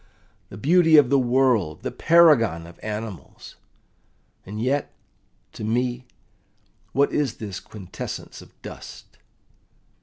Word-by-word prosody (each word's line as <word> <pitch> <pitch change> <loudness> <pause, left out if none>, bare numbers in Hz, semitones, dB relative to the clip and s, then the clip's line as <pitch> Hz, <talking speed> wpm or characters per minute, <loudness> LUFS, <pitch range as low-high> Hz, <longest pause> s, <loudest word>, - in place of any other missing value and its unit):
The 95 - -10
beauty 160 - +5
of 140 -4 +5
the 140 - +5
world, 120 - +1
the - - -3
paragon 125 - +4
of 85 0 -14
animals! 105 -6 -7 0.9
And 105 +2 -6
yet, 135 +5 -1 0.6
to - - -8
me, 120 +3 -1 0.8
what 140 +1 +1
is 145 -5 0
this 100 -4 -6
quintessence 100 -5 -8
of - - -19
dust? - - -11
120 Hz, 115 wpm, -23 LUFS, 105-140 Hz, 0.9 s, beauty